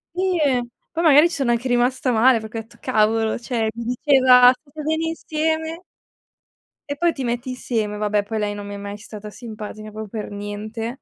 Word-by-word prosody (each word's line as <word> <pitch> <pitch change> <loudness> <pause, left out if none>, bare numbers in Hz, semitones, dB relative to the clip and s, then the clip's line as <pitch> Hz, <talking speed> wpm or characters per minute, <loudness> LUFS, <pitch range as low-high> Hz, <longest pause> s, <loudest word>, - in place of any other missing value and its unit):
Sì 370 -1 +1
e 255 -5 +2 0.3
poi 335 +1 -2
magari 310 +1 +7
ci 340 - -5
sono 270 -5 +1
anche 240 +2 0
rimasta 250 +1 +1
male, 235 +1 +5
perché 220 +1 -7
ho 225 - -2
detto 225 - -19
cavolo, 220 -2 +2
cioè 235 -2 -2
mi 235 0 -5
diceva: 255 -2 +6
"State 285 +3 -9
bene 315 +2 -1
insieme!" 320 +1 -2 1.0
e 285 - -3
poi 340 +2 +2
ti 270 - -5
metti 240 +1 -2
insieme, 225 -4 -2
vabbè 210 0 +1
poi 220 +1 -4
lei 205 -1 -1
non 205 0 -7
mi 205 - -7
è 200 - -6
mai 200 0 -6
stata 210 0 -9
simpatica 215 -1 -8
proprio 215 0 -7
per 210 -1 -6
niente. 215 +4 -5
240 Hz, 195 wpm, -22 LUFS, 215-280 Hz, 1.0 s, magari